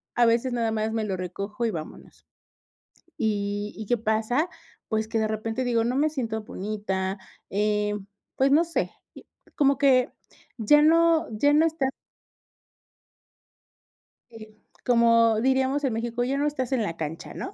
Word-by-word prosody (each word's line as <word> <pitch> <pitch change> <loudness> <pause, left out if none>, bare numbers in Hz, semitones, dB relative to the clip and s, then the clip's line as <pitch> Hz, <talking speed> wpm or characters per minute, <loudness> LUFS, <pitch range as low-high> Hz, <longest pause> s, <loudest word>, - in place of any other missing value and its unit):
a 240 - +4
veces 235 +2 +2
nada 230 -2 0
más 220 0 -1
me 225 -1 -1
lo 190 -2 -2
recojo 200 +5 -4
y 225 - 0
vámonos, 155 -3 -9 0.9
y 205 -1 -2
y, 220 - -7
¿qué 240 - +2
pasa?, 225 +9 0 0.4
pues, 220 -1 -1
que 225 0 -1
de 220 -1 +1
repente 225 +3 -3
digo 235 -2 +1
no 250 +2 -1
me 305 +2 +2
siento 225 -6 -3
bonita, 195 -3 -3 0.3
em, 210 0 -1 0.3
pues 270 +1 +3
no 320 +3 +5
sé, 335 - -2 0.7
como 280 -2 +3
que, 265 -2 +4 0.5
ya 295 +7 +5
no 330 +1 +4
ya 290 +4 +4
no 315 +2 +5
está 305 -5 -1 2.4
eh, 215 -1 -12 0.3
como 230 -2 +4
diríamos 265 +3 +1
en 255 - +1
México, 235 +1 -2
ya 265 +3 -1
no 290 - +1
estás 270 -4 -2
en 255 -3 +2
la 170 -5 -3
cancha, 160 0 -6
¿no? 385 - -6
230 Hz, 155 wpm, -25 LUFS, 215-265 Hz, 2.4 s, no